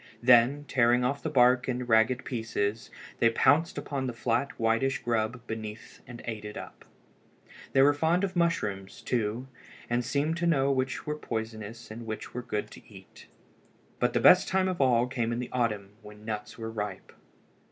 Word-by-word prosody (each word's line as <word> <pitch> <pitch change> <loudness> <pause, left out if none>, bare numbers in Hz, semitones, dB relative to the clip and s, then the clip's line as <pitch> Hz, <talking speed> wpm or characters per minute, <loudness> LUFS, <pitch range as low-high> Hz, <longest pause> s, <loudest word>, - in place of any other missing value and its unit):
Then, 125 +4 +5
tearing 125 -1 +3
off 140 +2 -1
the 160 - -3
bark 125 -2 +4
in 125 0 -2
ragged 115 +2 +3
pieces, 110 -3 -2 0.3
they 115 - +5
pounced 150 +9 +3
upon 135 -2 -3
the 125 - -3
flat 120 +3 0
whitish 115 +4 +1
grub 120 +1 -1
beneath 110 -1 -7
and 120 -1 -10
ate 110 -2 -5
it 105 0 -7
up. - - -10 0.9
They 135 - +6
were 145 +1 +5
fond 165 +5 +1
of 190 -1 -2
mushrooms, 105 - -1
too, 115 +2 -1 0.4
and 120 +1 +1
seemed 145 +6 -1
to 170 0 0
know 140 -4 +3
which 130 0 -1
were 150 - -2
poisonous 110 -3 -6
and 115 +1 -8
which 110 0 -6
were 125 - -4
good 110 -4 -4
to - - -15
eat. - - -15 0.7
But - - +1
the - - +2
best 185 - +7
time 190 0 +1
of 185 -5 -1
all 125 -3 +4
came 120 -2 -2
in 120 - -2
the 125 0 -5
autumn 105 -5 -1
when 105 0 -13
nuts 110 +1 -5
were 115 -1 -5
ripe. 105 -2 -5
120 Hz, 180 wpm, -28 LUFS, 110-135 Hz, 0.9 s, best